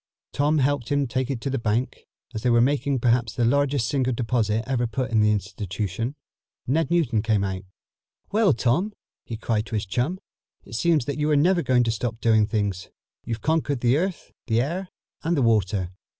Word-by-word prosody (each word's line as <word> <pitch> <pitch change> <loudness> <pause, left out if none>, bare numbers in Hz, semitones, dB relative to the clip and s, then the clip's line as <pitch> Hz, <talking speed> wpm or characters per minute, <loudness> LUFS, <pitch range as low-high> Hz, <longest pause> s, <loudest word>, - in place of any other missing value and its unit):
Tom 150 +2 +2
helped 140 -3 +1
him 145 -1 +1
take 130 +1 -2
it 135 -4 -2
to 135 - -2
the 135 - -1
bank. 115 +3 -2 0.3
As 110 - -4
they 125 - +1
were 120 0 +4
making 140 +2 +2
perhaps 120 -2 +1
the 120 - +1
largest 140 -1 +2
single 130 -2 0
deposit 115 -2 0
ever 125 -2 0
put 125 +3 -3
in 110 -1 +3
the 105 - +4
institution, 105 +4 -3 0.5
Ned 150 +3 +1
Newton 140 -11 +2
came 105 -3 +1
out. 95 -1 -3 0.7
"Well, 210 -3 +4
Tom," 155 - 0 0.3
he 115 - -5
cried 110 0 -1
to 110 - -4
his 105 - -1
chum, 125 - -1 0.5
"it 100 - -14
seems 155 +2 +2
that 145 +1 -3
you 150 +1 +1
are 150 - +4
never 175 +4 +3
going 125 -5 +3
to 115 - +1
stop 115 0 -3
doing 110 -3 +3
things. 100 -5 -2 0.4
You've 115 -1 -4
conquered 150 -5 0
the 120 +1 +3
air, 180 +4 0 0.3
the 115 0 +2
earth 180 +6 -4 0.3
and 165 +1 0
the 135 - +2
water." 100 -5 +1
120 Hz, 195 wpm, -24 LUFS, 110-145 Hz, 0.7 s, were